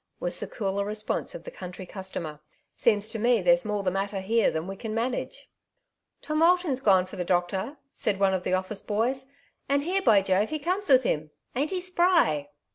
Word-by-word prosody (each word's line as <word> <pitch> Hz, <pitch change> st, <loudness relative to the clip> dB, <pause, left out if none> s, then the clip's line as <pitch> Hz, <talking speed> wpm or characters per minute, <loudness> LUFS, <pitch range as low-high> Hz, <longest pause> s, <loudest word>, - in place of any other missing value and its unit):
" -, -, -47 dB
was -, -, -1 dB
the -, -, -4 dB
cooler 200 Hz, -2 st, -2 dB
response 215 Hz, -, -3 dB
of -, -, -8 dB
the -, -, -8 dB
country 180 Hz, -, -8 dB
customer. 180 Hz, -5 st, -6 dB, 0.2 s
'* -, -, -47 dB
Seems 210 Hz, -2 st, +3 dB
to 225 Hz, -, -3 dB
me 235 Hz, -2 st, +3 dB
there^s 175 Hz, 0 st, +4 dB
more 210 Hz, -1 st, -2 dB
the 185 Hz, -, +1 dB
matter 195 Hz, +1 st, -2 dB
here 225 Hz, +4 st, +2 dB
than 160 Hz, +1 st, -3 dB
we 195 Hz, +1 st, -6 dB
can 220 Hz, +1 st, -5 dB
manage." 240 Hz, +3 st, -3 dB, 0.4 s
" -, -, -54 dB
Tom 305 Hz, +1 st, -1 dB
Alton's 340 Hz, -5 st, +3 dB
gone 190 Hz, -7 st, +4 dB
for 185 Hz, +1 st, -10 dB
the 180 Hz, -, -1 dB
doctor,^' 190 Hz, -, -1 dB
said 200 Hz, -3 st, -1 dB
one 195 Hz, -1 st, +3 dB
of 190 Hz, -, 0 dB
the -, -, -2 dB
oflSce 185 Hz, +2 st, -2 dB
boys, 250 Hz, +5 st, 0 dB, 0.2 s
'' -, -, -42 dB
and 280 Hz, 0 st, +2 dB
here, 375 Hz, +5 st, 0 dB
by 210 Hz, -, +5 dB
Jove, 195 Hz, +2 st, +2 dB
he 310 Hz, -, -2 dB
comes 365 Hz, +6 st, -1 dB
with 260 Hz, -1 st, +6 dB
him. 155 Hz, -7 st, -1 dB, 0.3 s
Ain't 285 Hz, +4 st, 0 dB
he 375 Hz, -, -1 dB
spry 345 Hz, -, +2 dB
210 Hz, 220 wpm, -27 LUFS, 190-270 Hz, 0.4 s, with